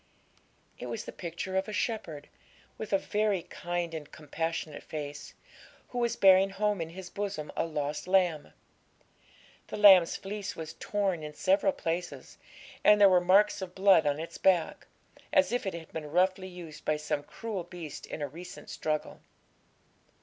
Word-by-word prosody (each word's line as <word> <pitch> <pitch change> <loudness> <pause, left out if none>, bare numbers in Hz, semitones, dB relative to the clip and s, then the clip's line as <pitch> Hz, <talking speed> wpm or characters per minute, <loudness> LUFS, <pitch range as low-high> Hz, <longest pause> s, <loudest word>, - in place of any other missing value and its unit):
It 125 - -6
was 115 -1 -5
the - - -6
picture 175 +2 -5
of 190 - 0
a - - -5
shepherd, 190 -10 -3 0.5
with 215 - -7
a 195 - +5
very 205 -2 0
kind 175 -1 -4
and 155 -2 -7
compassionate 155 0 -4
face, 145 -1 -7 0.5
who 245 - -4
was 235 -1 +1
bearing 190 0 +6
home 205 -1 0
in 165 - -4
his 180 +1 -9
bosom 200 -7 -4
a - - 0
lost 150 0 -3
lamb. 180 -5 +2 1.2
The - - -6
lamb's 190 -5 +7
fleece 205 0 -5
was 160 -1 -7
torn 195 -5 -1
in 150 -1 -7
several 195 +3 +3
places, 175 0 -5 0.4
and 210 0 +7
there 200 -1 +8
were 180 -1 +5
marks 200 +3 +4
of 185 -1 -7
blood 190 -5 +5
on 145 +1 0
its 165 - -7
back, 180 -4 +2 0.4
as 185 +2 +4
if 245 -4 -1
it 190 - -2
had 165 -1 -10
been 155 -2 -5
roughly 185 +3 +1
used 175 -4 -10
by 155 - +1
some 150 -1 -2
cruel 205 +5 -5
beast 170 -4 -9
in 150 - -5
a - - -1
recent 170 +6 -10
struggle. 155 -1 -3
180 Hz, 165 wpm, -30 LUFS, 155-195 Hz, 1.2 s, there